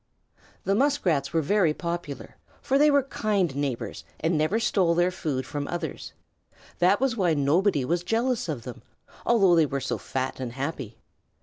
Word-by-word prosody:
The 195 Hz, -, +1 dB
Muskrats 210 Hz, -, +1 dB
were 165 Hz, -1 st, +1 dB
very 170 Hz, -2 st, +2 dB
popular, 170 Hz, -4 st, -5 dB, 0.2 s
for 275 Hz, 0 st, +1 dB
they 300 Hz, +1 st, +6 dB
were 285 Hz, -1 st, +4 dB
kind 205 Hz, -, -1 dB
neighbors 120 Hz, -, -3 dB, 0.2 s
and 160 Hz, +2 st, 0 dB
never 155 Hz, +8 st, +1 dB
stole 185 Hz, -7 st, +2 dB
their 175 Hz, +1 st, +2 dB
food 150 Hz, -8 st, -3 dB
from 145 Hz, -1 st, -4 dB
others. 175 Hz, -, -5 dB, 0.7 s
That 185 Hz, +3 st, +4 dB
was 265 Hz, -2 st, +1 dB
why 180 Hz, -7 st, +2 dB
nobody 145 Hz, +1 st, +2 dB
was 170 Hz, +4 st, 0 dB
jealous 230 Hz, +1 st, 0 dB
of 135 Hz, -7 st, -4 dB
them, 125 Hz, -1 st, -8 dB, 0.5 s
although 200 Hz, -7 st, +5 dB
they 160 Hz, -2 st, +4 dB
were 140 Hz, 0 st, -2 dB
so -, -, -3 dB
fat 130 Hz, 0 st, -3 dB
and 125 Hz, -3 st, -5 dB
happy. 135 Hz, -4 st, -5 dB
170 Hz, 170 wpm, -26 LUFS, 140-205 Hz, 0.7 s, they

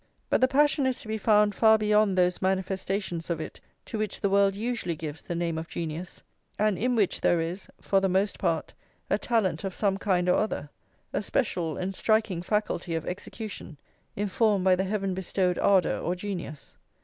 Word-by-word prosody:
But -, -, +3 dB
the 255 Hz, -, +6 dB
passion 285 Hz, 0 st, +3 dB
is 260 Hz, -, -1 dB
to -, -, -11 dB
be 220 Hz, 0 st, -2 dB
found 210 Hz, -1 st, +4 dB
far 220 Hz, 0 st, +5 dB
beyond 210 Hz, -2 st, +2 dB
those 180 Hz, 0 st, +2 dB
manifestations 190 Hz, -2 st, -1 dB
of 170 Hz, -2 st, -1 dB
it 155 Hz, -, -7 dB, 0.3 s
to 220 Hz, -, -5 dB
which 215 Hz, -1 st, -2 dB
the 200 Hz, -, 0 dB
world 200 Hz, 0 st, +4 dB
usually 220 Hz, -5 st, -2 dB
gives 155 Hz, -1 st, -6 dB
the 175 Hz, -, -5 dB
name 170 Hz, -1 st, -1 dB
of 165 Hz, -, -6 dB
genius, 165 Hz, +2 st, -6 dB, 0.3 s
and 210 Hz, -1 st, +2 dB
in 245 Hz, +6 st, 0 dB
which 205 Hz, -5 st, +1 dB
there 175 Hz, -, +3 dB
is, 170 Hz, +4 st, -4 dB
for 195 Hz, -, +2 dB
the 195 Hz, -, +2 dB
most 195 Hz, +3 st, +1 dB
part, 165 Hz, -4 st, -1 dB, 0.4 s
a 200 Hz, -, +3 dB
talent 205 Hz, -9 st, 0 dB
of 195 Hz, -2 st, -4 dB
some 195 Hz, -2 st, +1 dB
kind 180 Hz, -3 st, +1 dB
or 180 Hz, -, +4 dB
other, 150 Hz, -9 st, -2 dB, 0.4 s
a -, -, 0 dB
special 180 Hz, -, -1 dB
and 185 Hz, +1 st, -3 dB
striking 215 Hz, -4 st, +1 dB
faculty 180 Hz, -3 st, -1 dB
of 160 Hz, -, -3 dB
execution, 190 Hz, -3 st, -7 dB, 0.4 s
informed 205 Hz, -1 st, +1 dB
by 185 Hz, -1 st, +6 dB
the 190 Hz, +1 st, -1 dB
heaven 195 Hz, -1 st, -1 dB
bestowed 185 Hz, -1 st, 0 dB
ardour, 195 Hz, -2 st, +3 dB
or 175 Hz, -, -1 dB
genius. 175 Hz, -6 st, -6 dB
195 Hz, 190 wpm, -27 LUFS, 175-210 Hz, 0.4 s, the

